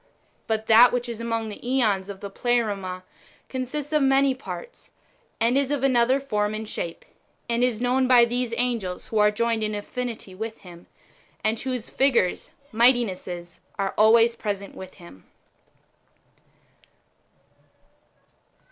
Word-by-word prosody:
But 220 Hz, -1 st, -1 dB
that 230 Hz, +3 st, +7 dB
which 245 Hz, 0 st, -2 dB
is 230 Hz, -1 st, -6 dB
amons; 230 Hz, -1 st, -2 dB
the -, -, -11 dB
JEons 220 Hz, -7 st, 0 dB
of 195 Hz, -1 st, -8 dB
the 200 Hz, -, -7 dB
Pleroma 200 Hz, -6 st, -1 dB, 0.5 s
consists 275 Hz, +3 st, -4 dB
of 305 Hz, -, +3 dB
many 270 Hz, 0 st, +4 dB
parts, 375 Hz, -, -9 dB, 0.5 s
and 235 Hz, +2 st, +2 dB
is 275 Hz, -1 st, +2 dB
of 285 Hz, -2 st, -1 dB
another 255 Hz, 0 st, +3 dB
form 210 Hz, -6 st, -1 dB
and 220 Hz, 0 st, -5 dB
shape, 170 Hz, -5 st, -5 dB, 0.4 s
and 235 Hz, 0 st, 0 dB
is 245 Hz, -3 st, +1 dB
known 255 Hz, +1 st, +1 dB
by 245 Hz, -2 st, +7 dB
those 245 Hz, 0 st, -2 dB
[angels] 230 Hz, -7 st, -2 dB
wdio 220 Hz, -, +1 dB
are 210 Hz, 0 st, +6 dB
joined 230 Hz, +1 st, 0 dB
in 215 Hz, -1 st, -1 dB
affinity 225 Hz, -1 st, -5 dB
with 220 Hz, +3 st, -6 dB
Him, 175 Hz, -3 st, -14 dB, 0.6 s
and 220 Hz, +1 st, 0 dB
whose 250 Hz, -3 st, -4 dB
figures 255 Hz, -9 st, +1 dB, 0.2 s
(mighti 240 Hz, +2 st, +5 dB
nesses) 175 Hz, -3 st, -8 dB, 0.2 s
are 195 Hz, -1 st, -1 dB
always 230 Hz, +2 st, +5 dB
present 200 Hz, -3 st, -4 dB
with 185 Hz, 0 st, -10 dB
Him. 170 Hz, -, -15 dB
230 Hz, 140 wpm, -24 LUFS, 205-250 Hz, 0.6 s, that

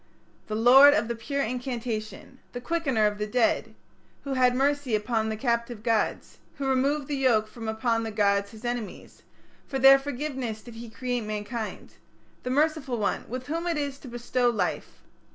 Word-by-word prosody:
"The 215 Hz, -, -3 dB
Lord 265 Hz, +6 st, +8 dB
of 235 Hz, -, 0 dB
the 235 Hz, -, -3 dB
Pure 275 Hz, +5 st, -2 dB
Incantation", 240 Hz, -1 st, -5 dB
"the 245 Hz, -, -4 dB
Quickener 270 Hz, -5 st, 0 dB
of 210 Hz, 0 st, 0 dB
the 210 Hz, -, -2 dB
Dead 240 Hz, +1 st, +1 dB, 0.2 s
", -, -, -35 dB
"Who 275 Hz, -, -3 dB
had 250 Hz, -1 st, +3 dB
mercy 280 Hz, -2 st, +1 dB
upon 220 Hz, +1 st, -1 dB
the 220 Hz, -, -3 dB
captive 235 Hz, -2 st, -2 dB
gods", 225 Hz, -2 st, -1 dB, 0.2 s
"Who 275 Hz, -, -4 dB
removed 270 Hz, +2 st, +1 dB
the 290 Hz, -, -2 dB
yoke 240 Hz, -6 st, +2 dB
from 225 Hz, 0 st, -8 dB
upon 225 Hz, +1 st, 0 dB
the 225 Hz, -, -3 dB
gods 200 Hz, -1 st, +1 dB
his 220 Hz, +3 st, -12 dB
enemies". 240 Hz, -3 st, -5 dB, 0.5 s
"For 270 Hz, -, -3 dB
their 270 Hz, +1 st, +8 dB
forgiveness 265 Hz, -5 st, -4 dB
did 240 Hz, -, -11 dB
he 230 Hz, +1 st, -9 dB
create 245 Hz, +1 st, -3 dB
mankind", 215 Hz, +1 st, -5 dB, 0.4 s
"The 250 Hz, -, -5 dB
Merciful 290 Hz, -2 st, +1 dB
One, 210 Hz, -2 st, -2 dB
with 255 Hz, +2 st, -5 dB
whom 330 Hz, +4 st, -3 dB
it 335 Hz, -3 st, 0 dB
is 280 Hz, -2 st, -3 dB
to -, -, -12 dB
bestow 240 Hz, +1 st, 0 dB
life!" 235 Hz, -, -3 dB
245 Hz, 180 wpm, -26 LUFS, 220-270 Hz, 0.5 s, Lord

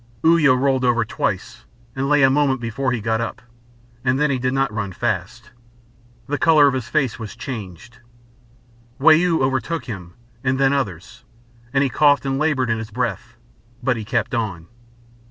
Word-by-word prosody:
Uya 160 Hz, -5 st, +5 dB
rolled 130 Hz, 0 st, +1 dB
over 120 Hz, -2 st, +2 dB
twice, 110 Hz, +3 st, -3 dB, 0.3 s
and 135 Hz, +1 st, -2 dB
lay 145 Hz, -1 st, +4 dB
a 135 Hz, -, +6 dB
moment 135 Hz, -2 st, +2 dB
before 120 Hz, +3 st, -2 dB
he 125 Hz, -, -1 dB
got 110 Hz, +1 st, -1 dB
up, 115 Hz, -, -4 dB, 0.6 s
and 130 Hz, +1 st, +1 dB
then 150 Hz, -1 st, +2 dB
he 130 Hz, -, -1 dB
did 130 Hz, +1 st, 0 dB
not 135 Hz, -3 st, 0 dB
run 105 Hz, -3 st, -3 dB
fast. -, -, -3 dB, 0.7 s
The 145 Hz, +2 st, -3 dB
colour 155 Hz, -3 st, +5 dB
of 140 Hz, -, +3 dB
his 130 Hz, -4 st, -3 dB
face 135 Hz, -6 st, 0 dB
was 110 Hz, -2 st, -7 dB
changed. 120 Hz, -, -8 dB, 1.0 s
Wau 155 Hz, +4 st, +6 dB, 0.3 s
overtook 135 Hz, +5 st, -1 dB
him, 90 Hz, -7 st, -8 dB, 0.3 s
and 130 Hz, 0 st, 0 dB
then 135 Hz, 0 st, +3 dB
others, 100 Hz, -, -4 dB, 0.5 s
and 135 Hz, 0 st, +2 dB
he 135 Hz, -, +1 dB
coughed 145 Hz, +1 st, +3 dB
and 135 Hz, 0 st, -1 dB
laboured 140 Hz, -6 st, +1 dB
in 110 Hz, -, 0 dB
his 110 Hz, -1 st, -6 dB
breath. 125 Hz, +2 st, -4 dB, 0.5 s
But 125 Hz, -1 st, +1 dB
he 110 Hz, -, -5 dB
kept 110 Hz, +1 st, -2 dB
on. 105 Hz, -9 st, -3 dB
130 Hz, 175 wpm, -21 LUFS, 115-140 Hz, 1.0 s, a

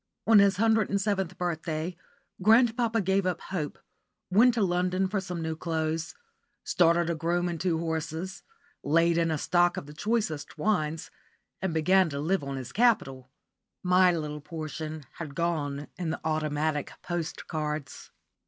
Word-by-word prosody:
*_ -, -, +3 dB
On 215 Hz, -, +9 dB
his 200 Hz, -2 st, +4 dB
hundred 220 Hz, -1 st, +3 dB
and 200 Hz, -, +1 dB
seventh 195 Hz, -3 st, -1 dB
birthday 170 Hz, -1 st, -3 dB, 0.5 s
grandpapa 230 Hz, +2 st, +4 dB
gave 190 Hz, 0 st, +1 dB
up 175 Hz, -2 st, -1 dB
hope, 160 Hz, -6 st, -4 dB, 0.5 s
went 235 Hz, +5 st, +5 dB
to 225 Hz, -, +2 dB
London 180 Hz, +1 st, +1 dB
for 195 Hz, +1 st, -1 dB
some 180 Hz, -3 st, -5 dB
new 160 Hz, 0 st, -2 dB
clothes, 160 Hz, 0 st, -2 dB, 0.5 s
started 170 Hz, -1 st, +3 dB
a 170 Hz, -, +1 dB
groom 170 Hz, +2 st, 0 dB
and 170 Hz, -2 st, -4 dB
two 175 Hz, -3 st, +1 dB
horses, 160 Hz, +2 st, -3 dB, 0.4 s
laid 165 Hz, +3 st, +3 dB
in 165 Hz, -1 st, +2 dB
a 160 Hz, -, 0 dB
stock 175 Hz, +3 st, +2 dB
of -, -, -4 dB
the 150 Hz, -, -11 dB
choicest 205 Hz, -5 st, -2 dB
wines, 160 Hz, -3 st, -1 dB, 0.5 s
and 190 Hz, -2 st, -1 dB
began 180 Hz, +3 st, +3 dB
to 140 Hz, -1 st, -4 dB
live 175 Hz, +3 st, 0 dB
on 140 Hz, -1 st, -4 dB
his 130 Hz, -2 st, -6 dB
capital. 135 Hz, -, +1 dB, 0.5 s
My 180 Hz, 0 st, +5 dB
little 150 Hz, -3 st, -3 dB
portion 155 Hz, -1 st, -6 dB
had 150 Hz, -4 st, -6 dB
gone 145 Hz, -4 st, -1 dB
in 175 Hz, -3 st, -2 dB
the 160 Hz, -, -3 dB
"Automatic 155 Hz, -1 st, -1 dB
Postcards." 155 Hz, -4 st, -4 dB
170 Hz, 155 wpm, -28 LUFS, 155-190 Hz, 0.5 s, On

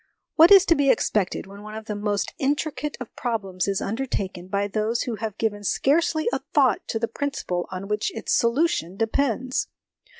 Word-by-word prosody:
What 330 Hz, +1 st, +7 dB
is 390 Hz, -1 st, +9 dB
to 335 Hz, -, +5 dB
be 285 Hz, -3 st, +2 dB
expected 200 Hz, -7 st, +1 dB
when 200 Hz, +1 st, -12 dB
one 215 Hz, +1 st, -9 dB
of 220 Hz, 0 st, -7 dB
the 215 Hz, -, -4 dB
most 205 Hz, 0 st, -2 dB
intri 290 Hz, +2 st, 0 dB
cate 295 Hz, 0 st, -4 dB
of 250 Hz, -, -9 dB
problems 195 Hz, -6 st, -2 dB
is 195 Hz, -1 st, 0 dB
undertaken 200 Hz, -6 st, -3 dB
by 200 Hz, +1 st, 0 dB
those 215 Hz, +3 st, -1 dB
who 235 Hz, -3 st, -4 dB
have 215 Hz, -1 st, -5 dB
given 205 Hz, -2 st, -1 dB
scarcely 310 Hz, -, +1 dB
a -, -, +1 dB, 0.2 s
thought -, -, +3 dB
to 225 Hz, -, -1 dB
the 230 Hz, +1 st, -1 dB
principle 225 Hz, -9 st, -3 dB
on 185 Hz, +1 st, -5 dB
which 210 Hz, -, -1 dB
its -, -, -2 dB
solution 235 Hz, -, +1 dB
depends 255 Hz, +2 st, 0 dB
220 Hz, 190 wpm, -24 LUFS, 200-275 Hz, 0.2 s, is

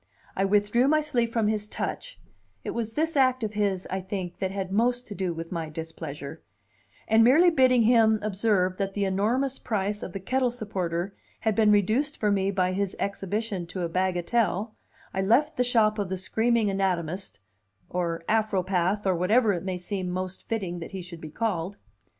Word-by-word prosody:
I 195 Hz, -, +1 dB
withdrew 205 Hz, +5 st, +3 dB
my 310 Hz, +2 st, +4 dB
sleeve 245 Hz, -6 st, 0 dB
from 225 Hz, -2 st, +1 dB
his 210 Hz, -1 st, -1 dB
touch -, -, -5 dB, 0.4 s
(it -, -, -3 dB
was 225 Hz, -1 st, -3 dB
this 320 Hz, +1 st, 0 dB
act 255 Hz, -3 st, +3 dB
of 215 Hz, -1 st, -2 dB
his, 200 Hz, -3 st, 0 dB
I 190 Hz, 0 st, -1 dB
think, 185 Hz, -2 st, -5 dB
that 190 Hz, -, -1 dB
had 190 Hz, -1 st, -4 dB
most 245 Hz, +4 st, +1 dB
to -, -, -5 dB
do 190 Hz, -3 st, -2 dB
with 165 Hz, 0 st, -6 dB
my 165 Hz, -3 st, -3 dB
displeasure), 155 Hz, -2 st, -7 dB, 0.7 s
and 220 Hz, +1 st, +5 dB
merely 315 Hz, +9 st, +6 dB
bidding 255 Hz, -5 st, +4 dB
him 220 Hz, -1 st, +5 dB
observe 195 Hz, -3 st, +1 dB
that 195 Hz, -1 st, -2 dB
the 200 Hz, -1 st, +1 dB
enormous 235 Hz, +8 st, 0 dB
price 205 Hz, -2 st, -2 dB
of 180 Hz, -, -6 dB
the 195 Hz, -, -4 dB
kettle 255 Hz, +6 st, +1 dB
supporter 195 Hz, -6 st, -3 dB, 0.3 s
had 220 Hz, -, +1 dB
been 215 Hz, 0 st, +4 dB
reduced 220 Hz, +9 st, +2 dB
for 210 Hz, -1 st, +2 dB
me 195 Hz, -1 st, +1 dB
by 185 Hz, -2 st, +1 dB
his 195 Hz, 0 st, -1 dB
exhibition 200 Hz, -1 st, -3 dB
to 180 Hz, +1 st, -4 dB
a 170 Hz, -, -1 dB
bagatelle, 190 Hz, +4 st, 0 dB, 0.4 s
I 190 Hz, -, 0 dB
left 260 Hz, +11 st, +3 dB
the 250 Hz, -, +2 dB
shop 220 Hz, -3 st, +2 dB
of 200 Hz, -3 st, -2 dB
the 190 Hz, -, -2 dB
screaming 220 Hz, +2 st, +1 dB
anatomist 190 Hz, -, -2 dB, 0.5 s
or 170 Hz, -2 st, -2 dB
Afropath, 195 Hz, -2 st, +1 dB
or 190 Hz, -, +3 dB
whatever 210 Hz, +5 st, +3 dB
it 175 Hz, -, -3 dB
may 185 Hz, -1 st, -2 dB
seem 185 Hz, 0 st, -4 dB
most 185 Hz, +1 st, -5 dB
fitting 190 Hz, -6 st, -2 dB
that 165 Hz, -, -8 dB
he 190 Hz, -2 st, -5 dB
should 170 Hz, -2 st, -10 dB
be 155 Hz, -, -7 dB
called. 200 Hz, 0 st, -2 dB
200 Hz, 185 wpm, -27 LUFS, 185-225 Hz, 0.7 s, merely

